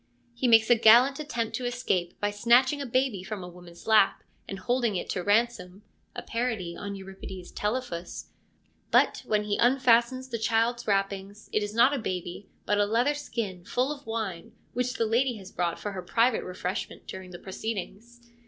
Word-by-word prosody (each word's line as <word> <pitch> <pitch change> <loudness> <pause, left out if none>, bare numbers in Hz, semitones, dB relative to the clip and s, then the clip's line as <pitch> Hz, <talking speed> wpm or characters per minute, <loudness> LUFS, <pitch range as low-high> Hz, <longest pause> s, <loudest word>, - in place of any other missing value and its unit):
He 240 +2 -1
makes 225 -1 +6
a - - +8
gallant 240 +5 +6
attempt 235 -7 -3
to 255 - -5
escape 220 -8 -2
by 205 0 0
snatching 245 +7 +3
a 275 - -4
baby 255 -5 0
from 195 0 -6
a - - -7
woman's 175 -1 -13
lap, 215 -3 +4 0.2
and 195 - -5
holding 240 +1 0
it 180 - -3
to 185 - -2
ransom 205 -2 0 0.3
(a - - -5
parody 225 -8 -2
on 200 0 -6
Euripides' 190 -1 -9
Telephus); 210 -6 -4 0.6
but, - - +3
when 210 -1 +1
he 205 -1 -1
unfastens 255 0 +3
the 230 -2 -3
child's 230 +2 +1
wrappings, 195 +1 -2
it 215 - +2
is 205 +1 -4
not 245 +5 +5
a 280 - -1
baby, 180 -1 -5 0.2
but 205 0 +1
a 205 - +4
leather 240 +7 +2
skin, 225 -11 -5
full 255 +9 0
of 285 -3 -8
wine, 215 -7 -4 0.2
which 250 0 -1
the 225 - 0
lady 240 +2 +1
has 195 -2 -11
brought 170 -1 -1
for 205 - -4
her 190 -2 -5
private 230 +6 +2
refreshment 185 0 -5
during 190 -1 -8
the 175 - -9
proceedings. 225 +5 -6
220 Hz, 180 wpm, -27 LUFS, 190-240 Hz, 0.6 s, a